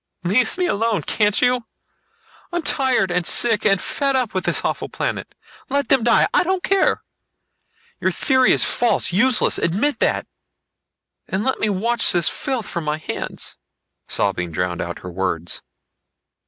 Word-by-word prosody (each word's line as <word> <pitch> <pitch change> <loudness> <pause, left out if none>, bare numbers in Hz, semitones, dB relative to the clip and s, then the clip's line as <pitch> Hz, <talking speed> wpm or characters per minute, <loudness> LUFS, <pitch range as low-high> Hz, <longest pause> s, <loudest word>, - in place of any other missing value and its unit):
"Leave 220 - +1
me 365 - +1
alone, 220 - 0
can't 210 0 +1
you! 245 -2 +1 0.8
I'm 345 -1 -2
tired 260 -11 +1
and 175 0 0
sick 220 +4 +2
and 195 -2 +3
fed 275 +5 0
up 250 -4 0
with 185 - -2
this - - +1
awful - - -2
planet. - - -4 0.3
Let 280 +1 -1
them 265 -4 +4
die. 235 0 +4
I - - +4
don't 370 0 -1
care! 390 -1 +2 1.0
Your - - +1
theory 260 -2 +2
is - - +4
false, 240 -6 +1
useless. 235 +6 +3
Admit 215 - 0
that! - - +1 1.0
And 190 +2 -2
let 265 - -1
me 215 - +1
wash 225 +4 +2
the 175 -1 +1
filth 250 - -1
from 170 - -4
my 150 0 -1
hands...." 155 - -5 0.5
Sobbing 95 -3 0
drowned 90 +1 -2
out 85 0 -5
her 90 - -6
words. 85 -2 -3
220 Hz, 155 wpm, -20 LUFS, 175-260 Hz, 1.0 s, them